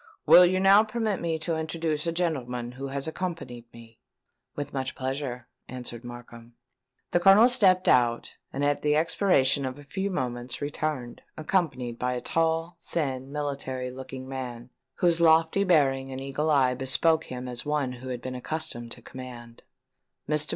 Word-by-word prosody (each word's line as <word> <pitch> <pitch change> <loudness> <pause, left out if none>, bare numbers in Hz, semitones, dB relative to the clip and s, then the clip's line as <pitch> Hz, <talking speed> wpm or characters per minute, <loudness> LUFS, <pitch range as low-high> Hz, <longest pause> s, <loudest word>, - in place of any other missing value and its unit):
"Will 180 0 +9
you 185 +1 +1
now 195 +2 +7
permit 220 -2 -2
me 165 -1 -1
to 165 +1 -2
introduce 160 -1 -2
a - - +1
gentleman 125 -8 -2
who 135 +2 -6
has 140 +2 -3
accompanied 160 -9 -5
me?" 115 -1 -15 0.6
"With 145 0 -5
much 130 -1 -3
pleasure," 130 -2 -4 0.2
answered 120 -1 -7
Markham. 120 -1 -11 0.6
The 175 - +3
Colonel 195 +6 +7
stepped 195 -8 +3
out, 120 -1 +2 0.2
and 140 +1 -1
at 145 0 +1
the 150 0 +2
expiration 155 -4 +3
of 130 0 -4
a 145 - -12
few 190 +7 -3
moments 125 -8 -3
returned, 145 -4 -3 0.2
accompanied 140 -8 -1
by 125 0 0
a 125 - -2
tall, 165 +1 0
thin, 135 -4 -3
military 140 -3 -3
looking 130 0 -8
man, 125 -2 -6 0.2
whose 170 -1 +2
lofty 165 +3 +4
bearing 135 -7 +2
and 130 - -5
eagle 135 +3 -2
eye 135 -4 +4
bespoke 145 +5 +2
him 125 0 -6
as 120 -1 -3
one 150 -3 -1
who 125 +1 -8
had 125 -1 -5
been 130 - -4
accustomed 125 -3 -4
to 120 - -15
command. 120 -2 -10 0.7
"Mr. 150 0 +1
140 Hz, 165 wpm, -27 LUFS, 125-165 Hz, 0.7 s, Will